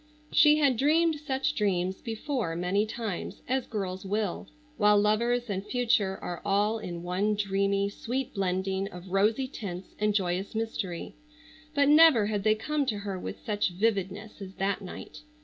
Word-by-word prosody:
She 300 0 +6
had 280 -5 +3
dreamed 315 +4 +3
such 285 0 -1
dreams 190 -5 0
before 230 - -3
many 185 +5 0
times, 220 -5 -5
as 260 0 0
girls 190 -4 -4
will, 205 -1 -2 0.3
while 210 -1 +5
lovers 235 +4 +1
and 195 -2 -3
future 210 -4 +1
are 175 -1 -5
all 205 +2 +1
in 175 -5 -6
one 195 +4 0
dreamy, 200 0 +1
sweet 255 +6 -4
blending 190 0 -1
of 180 -2 -10
rosy 215 +7 +2
tints 190 -8 -7
and 210 -1 +1
joyous 190 +1 -1
mystery, 210 -6 -3 0.6
but 285 -1 +4
never 300 -7 +7
had 205 -1 -1
they 215 0 +4
come 290 +5 -1
to 215 -5 0
her 200 -2 -4
with - - -7
such 210 -2 0
vividness 200 +1 -1
as 190 -1 -8
that 195 +1 -1
night. 190 - -9
210 Hz, 160 wpm, -28 LUFS, 190-235 Hz, 0.6 s, never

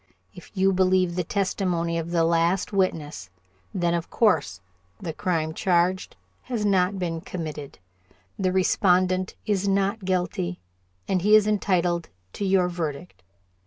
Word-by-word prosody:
If 180 - -13
you 190 +1 +3
believe 185 -1 +2
the 180 - 0
testimony 180 -3 -1
of 165 0 -5
the 170 -1 +2
last 170 +4 +1
witness, 150 - -1 0.4
then, 175 -2 0
of 170 -1 -2
course, 160 - +1 0.4
the 165 - -5
crime 160 -3 -1
charged 180 +2 +1 0.3
has 235 -4 -2
not 190 -1 +2
been 165 -3 -3
committed, 155 -6 -6 0.6
the 185 -1 +1
respondent 185 0 +2
is 200 -2 0
not 195 +2 0
guilty, 180 - -2 0.5
and 185 -2 +1
he 210 +3 +5
is 215 -1 +6
entitled 180 -5 0 0.2
to 200 - -3
your 190 -2 +3
verdict. 160 - -5
180 Hz, 135 wpm, -25 LUFS, 170-195 Hz, 0.6 s, is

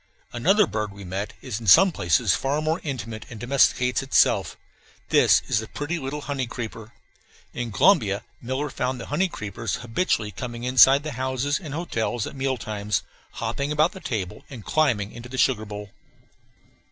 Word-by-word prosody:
Another 195 - +4
bird 105 - -3
we 100 0 -11
met 95 +3 -4
is 120 -5 -4
in 115 - -9
some 190 - +8
places 85 - +2
far 140 +2 -1
more 155 +3 -1
intimate, 115 -6 -5
and 115 - -9
domesticates 125 0 +2
itself. 135 - +2 0.5
This - - +5
is - - +2
the 110 - -6
pretty 150 +8 -4
little 145 +1 -4
honey 140 -3 -3
creeper. 115 -1 -7 0.6
In 120 -1 -4
Colombia 105 - +3 0.2
Miller 130 +4 -3
found 125 0 -2
the 115 - -6
honey 185 +6 +2
creepers 105 - -4
habitually 115 -3 -1
coming 120 +3 -6
inside 130 +2 +6
the 155 - -4
houses 130 +2 0
and 150 -5 -7
hotels 120 -8 -2
at - - -8
meal 135 -1 -1
times, 105 -4 -2 0.3
hopping 140 +1 -3
about 155 +4 +3
the 190 - -10
table, 100 - -4
and 120 -7 -10
climbing 120 -10 +1
into 120 +1 -10
the 130 - -6
sugar 125 -5 +2
bowl. 105 -1 -8
125 Hz, 170 wpm, -24 LUFS, 110-145 Hz, 0.6 s, some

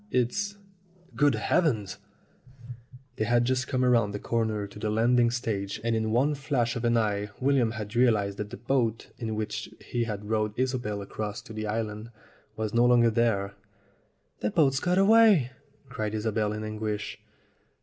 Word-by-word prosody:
It's 200 - -1 0.6
Good 145 -1 +3
heavens 110 - 0 0.6
!" 125 +2 -16
They 110 - 0
had 120 +1 +3
just 130 +1 0
come 130 -2 0
round 115 -5 +3
the - - -3
corner 110 -3 -1
to 100 +1 -11
the 105 - -2
landing 120 +2 +3
stage, 110 -5 -3
and 115 -1 +1
in 110 0 0
one 130 +7 +2
flash 135 -5 -1
of 120 - -4
an 120 0 +3
eye 105 -2 0
William 130 -3 +2
had 110 0 -6
realized 105 -5 +2
that 105 -1 -4
the 125 - -8
boat 120 -2 -1
in 110 -3 -3
which 110 0 -4
he 120 -1 -2
had 105 -2 -5
rowed 105 -1 -1
Isobel 125 -6 -1
across 105 +1 -5
to - - -11
the 110 0 -4
island 110 0 -3 0.5
was 110 0 -3
no 120 +1 +4
longer 120 -1 +5
there. 110 -4 +1 0.9
"The 105 - 0
boat's 135 0 +3
got 180 +3 +1
away!" 200 - +5 0.4
cried 110 -4 -3
Isobel 110 -1 -1
in 105 0 -4
anguish. 110 -1 -4
115 Hz, 170 wpm, -27 LUFS, 105-125 Hz, 0.9 s, longer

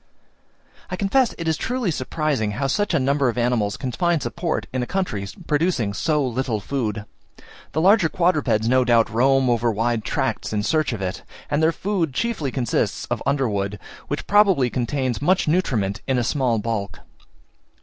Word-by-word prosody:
I 185 - -2
confess 225 +6 +1
it 165 - -4
is 160 -1 +1
truly 245 -6 -1
surprising 135 -6 -1
how 135 +6 -2
such 195 +6 0
a - - +3
number 135 0 +2
of 120 - -4
animals 120 -4 0
can 130 - -4
find 175 +2 +1
support 165 +4 -2
in 130 - -1
a 125 - -3
country 110 - -2 0.2
producing 150 - 0
so 150 +5 +1
little 125 -2 -1
food. 110 -3 -3 0.7
The 155 - +1
larger 190 -2 +5
quadrupeds 145 -12 +1
no 130 +1 +4
doubt 115 -2 +3
roam 135 +3 +3
over 120 -1 +2
wide 115 +1 0
tracts - - -2
in 105 -1 0
search 155 +5 +1
of 105 -5 -4
it; 90 0 -3 0.3
and 145 +1 +1
their 160 +1 +4
food 170 -7 -2
chiefly 220 -11 -1
consists 125 -3 -1
of - - -1
underwood, 105 -8 0 0.3
which - - -3
probably 195 - +4
contains 130 0 -1
much 180 +4 +2
nutriment 120 - 0
in 130 -1 +1
a 120 - +1
small 125 -2 +1
bulk. 105 -5 -3
135 Hz, 170 wpm, -22 LUFS, 115-165 Hz, 0.7 s, larger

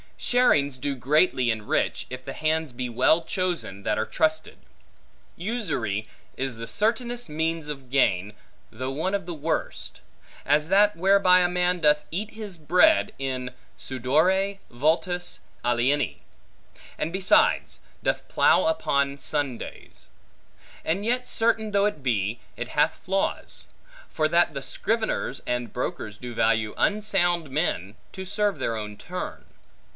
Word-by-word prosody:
Sharings 145 - +2
do 140 +1 -2
greatly 130 0 +2
enrich, 110 -2 -1
if 130 0 -7
the 135 - -5
hands 155 -2 -1
be 125 0 -4
well 130 +8 +3
chosen, 175 - -2
that 105 - 0
are 110 - 0
trusted. 155 +4 0 0.8
Usury 145 - -2 0.3
is 130 -3 -1
the 115 0 -6
certainest 235 - 0
means 160 0 -2
of 135 -4 -7
gain, 105 -7 +2 0.4
though 130 +4 -4
one 160 +8 -2
of 195 -3 -3
the 175 - -5
worst; 160 - -3 0.4
as 150 +2 +2
that 205 +2 +5
whereby 190 0 +5
a 175 - +3
man 180 0 +1
doth 150 -1 +3
eat 205 +6 -3
his 210 -5 -7
bread, 180 - +4
in 130 -2 -3 0.3
sudore 165 +10 +1
vultus 165 +7 0 0.2
alieni; 120 +4 +1 0.8
and 160 - -2
besides, 190 +1 +3 0.2
doth - - -1
plough - - +4
upon 140 - +1
Sundays. 140 -3 -4 0.7
But 180 +5 -1
yet 250 +3 0
certain 225 -1 +1
though 200 -1 +3
it 180 -8 -1
be, 115 -3 0 0.2
it - - -4
hath - - +1
flaws; 195 +1 -2 0.4
for - - +1
that - - +3
the - - -4
scriveners 225 - -2
and 125 -1 -2
brokers 110 -3 -4
do 125 +1 -7
value 110 -2 +1
unsound 185 -6 +1
men, 115 - -1 0.2
to 190 - -6
serve 205 +1 0
their 115 - -1
own 105 -1 -6
turn. - - -6
155 Hz, 135 wpm, -25 LUFS, 125-190 Hz, 0.8 s, that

